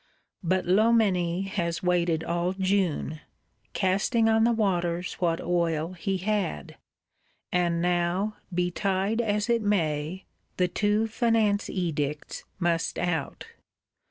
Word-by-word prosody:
But 185 +2 +1
Loménie 190 -3 +3
has 170 -4 -2
waited 170 -2 +1
all 175 +2 -1
June, 190 -5 0 0.5
casting 205 +4 +2
on 225 0 +4
the 235 - +4
waters 180 -5 0
what 165 -2 +1
oil 170 -1 0
he 190 +2 -2
had; 185 - -2 0.8
and 170 -1 +1
now, 180 +4 0
betide 190 +4 0
as 210 -2 0
it 235 -1 +2
may, 170 -4 -1 0.3
the 180 - +3
two 210 +4 +1
Finance 225 -2 +1
Edicts 150 -5 -3
must 170 -2 0
out. 165 -5 -2
180 Hz, 110 wpm, -27 LUFS, 170-205 Hz, 0.8 s, on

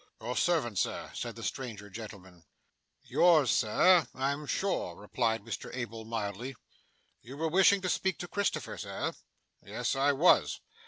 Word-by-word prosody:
'Your 120 +3 -4
servant, 140 - +1
sir,' - - -2
said - - -5
the - - -9
stranger 110 -6 -5
gentleman. 95 -4 -10 0.6
'Yours, 155 -9 +4
sir, 160 +8 +4
I'm 140 +3 -2
sure,' 190 - -1
replied 110 +2 -1
Mr 115 - -6
Abel 115 -3 -5
mildly. 115 +3 -4 0.7
'You 130 +4 -10
were 160 +2 0
wishing 195 +3 +5
to 185 - -2
speak 190 0 0
to 175 - -6
Christopher, 200 +2 -2
sir?' - - -3 0.5
'Yes, - - -2
I 140 +1 +3
was. 155 +6 +4
125 Hz, 145 wpm, -30 LUFS, 110-165 Hz, 0.7 s, wishing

